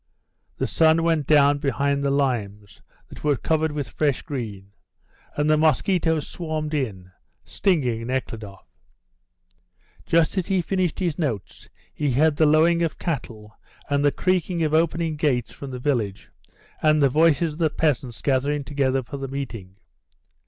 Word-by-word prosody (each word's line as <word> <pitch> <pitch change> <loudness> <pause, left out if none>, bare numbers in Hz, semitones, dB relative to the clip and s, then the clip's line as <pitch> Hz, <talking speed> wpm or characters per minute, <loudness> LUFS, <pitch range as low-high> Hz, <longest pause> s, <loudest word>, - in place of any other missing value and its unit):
The - - -1
sun 160 0 +3
went 160 -4 +1
down 145 -1 +5
behind 140 0 0
the 140 - +1
limes, 105 -8 -2 0.3
that - - -12
were 150 -1 +2
covered 160 +2 0
with 145 -3 -4
fresh 145 +3 -1
green, 105 -9 -6 0.7
and 145 +1 +1
the 155 0 +4
mosquitoes 160 0 +1
swarmed 155 -2 -4
in, 100 -11 -3 0.3
stinging 125 - 0
Nekhludoff. 115 -6 -5 1.4
Just 165 +3 +2
as 180 - -4
he 190 -1 +1
finished 180 -1 -1
his 175 -4 -2
notes, 120 - -4 0.2
he 145 -3 -1
heard 150 +3 +3
the 155 - +4
lowing 165 +3 +4
of 165 -3 -1
cattle 115 -9 -5 0.4
and 140 0 +2
the 145 - +4
creaking 180 -1 0
of 155 -1 0
opening 165 0 +1
gates 135 -6 0
from 140 - -8
the 130 - -6
village, 120 -7 -2 0.5
and 155 0 +4
the 140 - +5
voices 155 +2 +2
of 150 - -12
the 160 -2 +2
peasants 135 -6 -1
gathering 140 +2 0
together 135 -2 0
for 140 +4 -7
the 135 0 -5
meeting. 115 -9 -6
145 Hz, 150 wpm, -23 LUFS, 130-160 Hz, 1.4 s, down